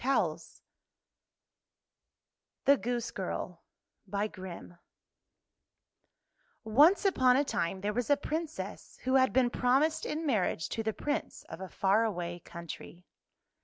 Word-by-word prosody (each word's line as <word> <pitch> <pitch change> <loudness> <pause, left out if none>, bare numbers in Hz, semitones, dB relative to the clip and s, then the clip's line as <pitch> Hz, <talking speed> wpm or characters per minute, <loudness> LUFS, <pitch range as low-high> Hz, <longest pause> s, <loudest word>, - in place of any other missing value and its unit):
[1241 270 +2 +2 2.3
THE 280 0 +6
GOOSE 240 -1 -2
GIRL 180 -2 -4 0.5
O 200 - -1 2.7
N 375 - +3
CE - - -10
upon 260 -10 +4
a 285 - +3
time 190 -6 -2
there 205 +1 -1
was 240 0 -2
a 285 - +5
Princess 315 +2 -5
who 260 - 0
had 260 -1 +5
been 250 -1 +3
promised 270 +7 +2
in 315 +2 -3
marriage 195 - 0
to 225 - -2
the 220 0 0
Prince 290 +6 -3
of - - -8
a 190 - -6
far 200 +3 +2
away 175 -5 -3
country. 170 +1 -9
245 Hz, 125 wpm, -31 LUFS, 190-280 Hz, 2.7 s, THE